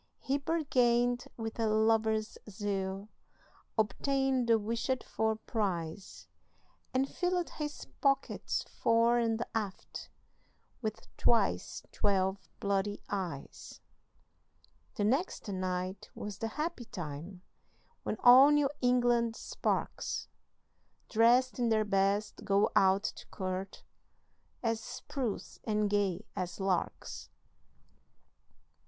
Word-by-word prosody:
He 275 +1 -1
bargained 245 -6 +2
with 225 0 -5
a 225 - +2
lover's 220 0 +2
zeal, 195 -1 -3 0.7
Obtained 260 +4 +1
the 230 - +6
wished 230 +4 -1
for 220 0 0
prize, 190 -6 -3 0.6
And 265 +1 +1
filled 355 +2 -1
his 295 -1 -5 0.2
pockets 275 -1 +1
fore 230 +1 +2
and 230 0 0
aft 210 -4 -4 0.7
With 215 -2 -4
twice 235 - +1
twelve 195 -1 0
bloody 200 +1 -1
eyes. 180 -9 -5 1.2
The 210 - -1
next 265 - 0
night 185 -1 -3
was 205 -1 -6
the 225 - -1
happy 300 +1 -3
time 175 +1 -7 0.6
When 215 - -3
all 255 +3 +10
New 295 -2 +3
England 240 -2 +3
sparks, - - -2 0.8
Drest 245 +3 +4
in 240 -1 +2
their 215 -1 +3
best, 200 +1 +1
go 200 0 +3
out 195 +1 +5
to - - -5
court, 190 0 -4 0.8
As 230 -1 +1
spruce 240 -2 -5
and 210 -1 +1
gay 200 -1 +1
as 180 +1 -4
larks. 190 -2 -2
220 Hz, 100 wpm, -32 LUFS, 195-245 Hz, 1.2 s, all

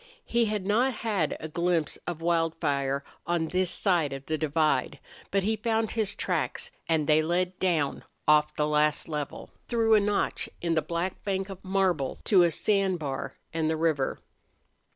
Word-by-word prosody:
He 235 0 +2
had 210 -3 -2
not 240 +6 +2
had 210 -9 -1
a 160 - -5
glimpse 170 -1 0
of 165 -2 -4
Wildfire 145 -5 0 0.2
on 170 -2 0
this 185 -1 +1
side 175 -7 +1
of 135 0 -7
the 155 - -1
divide, 155 -3 +1 0.3
but 195 -1 +1
he 220 +3 +1
found 220 0 0
his 215 -2 0
tracks, 480 - -2 0.2
and 160 -2 +2
they 155 +1 +4
led 180 +3 -1
down 160 -7 0 0.2
off 150 0 +4
the 150 - +1
last 150 0 +2
level, 150 -3 -5 0.2
through 225 -2 +2
a 215 - +7
notch 205 0 0
in 170 -1 0
the 160 - +2
black 170 +4 -3
bank 195 -1 -2
of 195 -1 -9
marble 185 -8 0
to 195 -4 +5
a 175 - +5
sand 195 +2 +1
bar 140 -4 -4 0.2
and 160 -1 0
the 160 - 0
river. 155 -4 +1
170 Hz, 175 wpm, -28 LUFS, 155-195 Hz, 0.3 s, a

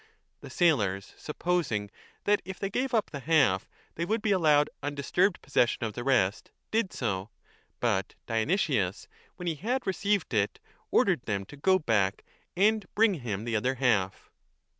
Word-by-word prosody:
The - - -10
sailors, 105 - +1
supposing 150 - -2 0.3
that 205 0 +2
if 190 +1 -7
they 195 0 -3
gave 260 +5 -1
up 225 -3 +1
the 140 - -5
half 135 -10 +2 0.2
they 165 - -3
would 215 +5 -1
be 215 - +2
allowed 150 -6 +4
undisturbed 145 +7 0
possession 120 -3 +1
of 110 -2 -2
the 120 - -5
rest, 110 -7 +1 0.2
did 220 -3 +1
so; 100 -4 -2 0.5
but 100 -5 0
Dionysius, 115 - 0 0.3
when 180 - -8
he 165 - +1
had 240 - -2
received 195 -3 0
it, 105 -2 +1 0.3
ordered 180 -9 +3
them 100 -3 -1
to 125 - -12
go 185 +7 +3
back 105 - 0 0.3
and 210 0 +3
bring 215 -1 +4
him 105 -4 -3
the 115 -1 -2
other 125 +5 +1
half. 105 -7 0
140 Hz, 160 wpm, -29 LUFS, -, 0.5 s, allowed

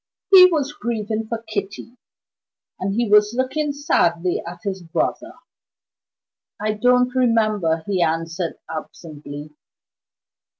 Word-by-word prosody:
He 370 -2 +10
was 295 -5 -1
grieving 225 -5 -3
for 230 0 -4
Kitty; 210 +3 -5 0.8
and 195 +1 -2
he 235 0 +1
was 210 +2 +4
looking 290 +3 -1
sadly 180 - 0
at 175 0 -8
his 190 -2 -4
brother. 305 - -2 1.3
"I 215 +1 -1
don't 250 +3 +2
remember," 215 -10 +1
he 190 -3 -1
answered, 165 +1 -1
absently. 150 -2 -8
210 Hz, 110 wpm, -21 LUFS, 170-250 Hz, 1.3 s, He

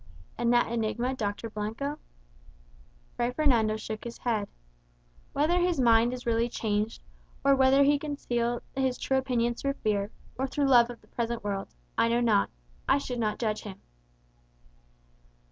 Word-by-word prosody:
"And 235 0 +1
that 240 -1 +3
enigma, 235 +2 -1
Dr. 210 -2 -3
Blanco?" 225 +8 -3 1.2
Fray 240 0 0
Fernando 245 -6 +2
shook 215 0 -6
his 235 0 -7
head. 220 -4 -1 0.8
"Whether 315 +5 +2
his 350 -3 +1
mind 235 -1 +5
was 250 0 -6
really 230 0 +1
changed, 215 -1 -2 0.4
or 275 0 +6
whether 270 +1 +5
he 285 +1 +4
concealed 240 -5 -2
his 265 -2 0
true 265 0 +1
opinions 240 -2 0
through 275 0 0
fear, 205 -5 -1 0.3
or 265 - +1
through 285 +2 0
love 245 -3 +6
of 240 - -9
the - - -23
present 235 -1 -3
world, 200 -1 -2 0.3
I - - +5
know 235 +1 +2
not 225 -4 +3 0.4
I - - +5
should 250 -3 -4
not 215 -2 0
judge 215 -2 -1
him." 200 -3 -9
240 Hz, 155 wpm, -28 LUFS, 220-265 Hz, 1.2 s, or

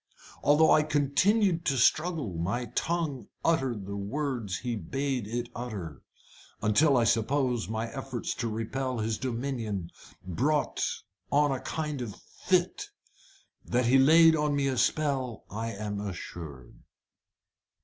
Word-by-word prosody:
Although 150 +2 +5
I 155 - +6
continued 165 +6 +2
to 140 -3 +1
struggle, 155 - +2
my 95 +9 -2
tongue 160 -6 -1 0.2
uttered 130 - +1
the 100 +1 -5
words 110 -1 -2
he 120 +2 -3
bade 130 +4 -2
it 120 +2 -3
utter, 100 - -6 0.6
until 135 +7 +4
I 120 - +4
suppose 120 +1 +1
my 110 +1 -2
efforts 135 -2 -4
to 115 - -1
repel 125 +4 -3
his 110 0 -1
dominion 115 -8 -3 0.3
brought 140 - 0 0.5
on 145 0 +4
a 135 - -1
kind 150 -4 -3
of 110 -5 -5
fit. 185 - -1 0.7
That 125 +1 0
he 130 +3 +5
laid 160 +4 +7
on 150 -1 +1
me 140 -1 +1
a 135 -2 0
spell 135 -3 0
I 115 +3 -3
am 105 0 -4
assured." 85 -9 -8
125 Hz, 130 wpm, -29 LUFS, 110-145 Hz, 0.7 s, laid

